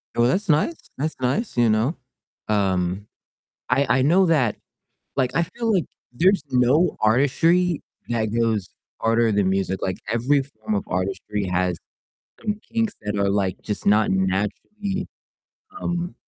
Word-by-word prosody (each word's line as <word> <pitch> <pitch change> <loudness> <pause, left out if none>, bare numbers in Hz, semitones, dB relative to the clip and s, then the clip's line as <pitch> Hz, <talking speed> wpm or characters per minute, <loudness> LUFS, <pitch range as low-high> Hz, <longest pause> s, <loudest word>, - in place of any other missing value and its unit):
Well, 120 0 +4
that's 195 +9 0
nice 155 - +2 0.2
that's 155 +3 -2
nice, 130 - -1
you 120 -2 +4
know, 110 +9 +1 0.5
um, 95 -1 0 0.6
I 130 0 +3
I - - +3
know 180 +6 +4
that, 135 -10 +2 0.6
like, 130 -2 +2
I 170 - +2
feel 225 +5 -2
like 180 -6 +2 0.3
there's 185 +6 +3
no 130 +7 +3
artistry 145 +9 +3 0.3
that 115 -2 0
goes 110 -4 +1 0.3
harder 115 0 +3
than 100 -2 +2
music. 95 0 0
Like, 95 +2 -2
every 130 +5 +2
form 110 -6 -5
of 100 - 0
artistry 100 +2 -2
has 90 -1 0 0.6
some 210 0 -2
kinks 225 -2 +1
that 105 0 -2
are, 100 0 +2
like, 100 -2 0
just 105 - -4
not 105 +1 +4
naturally, 105 - -1 0.8
um, 175 +1 -2
120 Hz, 145 wpm, -23 LUFS, 105-165 Hz, 0.8 s, Well